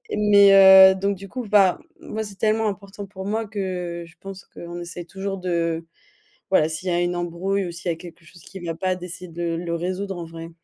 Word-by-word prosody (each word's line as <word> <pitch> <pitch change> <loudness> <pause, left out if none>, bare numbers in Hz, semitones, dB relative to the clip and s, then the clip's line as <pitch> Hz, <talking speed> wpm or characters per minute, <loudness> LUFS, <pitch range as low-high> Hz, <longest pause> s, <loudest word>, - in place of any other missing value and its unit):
mais 195 -2 +8
heu, - - -7
donc 200 0 -1
du 195 - -10
coup, 250 +4 -6
enfin, 200 -4 +4 0.2
moi 220 0 -5
c'est 200 -2 -9
tellement 220 +2 +1
important 200 0 -8
pour 190 -1 -9
moi 220 +3 -1
que, 180 -4 -4
je 165 - -18
pense 195 -1 -9
qu'on 175 0 -9
essaye 175 0 -7
toujours 195 +2 -5
de 170 -2 -2 0.7
voilà 160 -5 +4
s'il 160 +4 -5
y 180 - +1
a 175 - +1
une 175 0 -1
embrouille 180 +3 -2
ou 170 - -6
s'il 170 +1 -4
y - - 0
a - - -15
quelque 170 0 -13
chose 170 0 -17
qui 195 - -11
vient 165 -2 -4
pas, 185 +1 0
d'essayer 180 0 -9
de 170 0 -3
le 170 0 -3
résoudre, 185 +3 -3
en 170 - -6
vrai. 165 0 -9
185 Hz, 225 wpm, -23 LUFS, 170-195 Hz, 0.7 s, mais